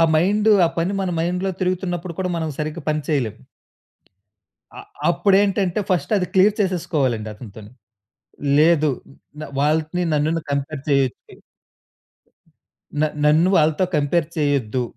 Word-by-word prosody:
Mind 205 +7 +2 0.2
ఆ - - +3
పని 170 +4 0
మన 190 - -1
మైండ్‌లో 180 +3 -1
తిరుగుతున్నప్పుడు 180 -1 -2
కూడా 185 -1 -1
మనం 160 -1 -2
సరిగ్గా 155 +2 -4
పని 155 0 0
చేయలేం. 130 -9 0 1.4
అ - - -7 0.3
అప్పుడు 195 +3 +3
ఏంటంటే 195 -1 0
ఫస్ట్ 180 +3 0
అది 185 -2 0
క్లియర్ 200 +2 +4
చేసేసుకోవాలండి 155 - -1
అతనితోని. 105 -1 -12 0.9
లేదు 155 -1 +4 0.5
న్ - - -5 0.2
వాళ్ళని 155 +4 0
నన్ను 155 +3 +1
కంపేర్ 140 0 -3
జేయొద్దు... 135 -3 -1 1.6
న - - +4 0.2
నన్ను 155 +4 +4
వాళ్ళతో 155 +3 +3
కంపేర్ 150 +2 +1
చేయొద్దు. 140 -5 0
160 Hz, 120 wpm, -21 LUFS, 145-180 Hz, 1.6 s, క్లియర్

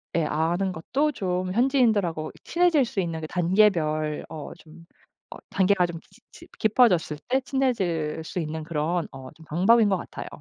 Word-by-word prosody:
예 165 - +2
아는 170 +6 0
것도 270 - -1
좀 185 -6 -2
현지인들하고 220 - +1
친해질 340 -6 +3
수 200 -4 -2
있는 165 -2 -4
그 155 - -5
단계별 165 -5 +1
어 155 -3 -7
좀 165 +1 -16 0.5
어 - - -8
단계가 190 -2 +2
좀 165 -1 -7
지 - - -24
지 - - -15
깊어졌을 195 - +3
때 260 +2 +2
친해질 190 - -1
수 170 - -8
있는 160 -1 -4
그런 165 +2 -1
어 130 -1 -10
좀 160 +1 -17
방법인 205 +7 +4
것 190 - +2
같아요. - - -8
175 Hz, 305 characters per minute, -25 LUFS, 160-215 Hz, 0.5 s, 방법인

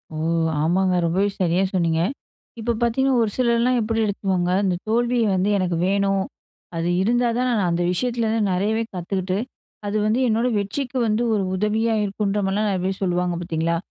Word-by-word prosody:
ஓ! - - -4 0.5
ஆமாங்க. 185 +3 +2
ரொம்பவே 190 +5 +1
சரியா 175 +2 +2
சொன்னீங்க. 165 -3 +1 0.6
இப்ப 235 +1 -1
பாத்தீங்கனா, 265 +3 +2
ஒரு 210 - -1
சிலர்லா 235 0 +2
எப்படி 225 +1 -1
எடுத்துவாங்க? 190 -3 -1
இந்த 185 -2 +1
தோல்விய 240 +1 +2
வந்து, 190 +3 +1
"எனக்கு 180 -3 0
வேணும். 195 0 +1 0.5
அது 165 +1 -1
இருந்தா 240 +4 +2
தா, - - +1
நான் 205 -7 +1
அந்த 170 +1 0
விஷயத்துலேருந்து 225 0 0
நெறையவே 210 +5 0
கத்துக்கிட்டு, 185 +1 -2 0.5
அது 210 +1 -1
வந்து, 220 +4 +1
என்னோட 230 +2 +1
வெற்றிக்கு 245 +6 -3
வந்து, 220 +2 +1
ஒரு 205 -3 +1
உதவியா 220 +3 +1
இருக்குன்ற" 205 0 -1
மாரிலா, 200 +2 0
நெறய 185 -2 -1
பேர் 190 0 -2
சொல்லுவாங்க, 180 -1 0
பாத்தீங்களா? 165 0 -1
200 Hz, 160 wpm, -22 LUFS, 180-225 Hz, 0.6 s, ஆமாங்க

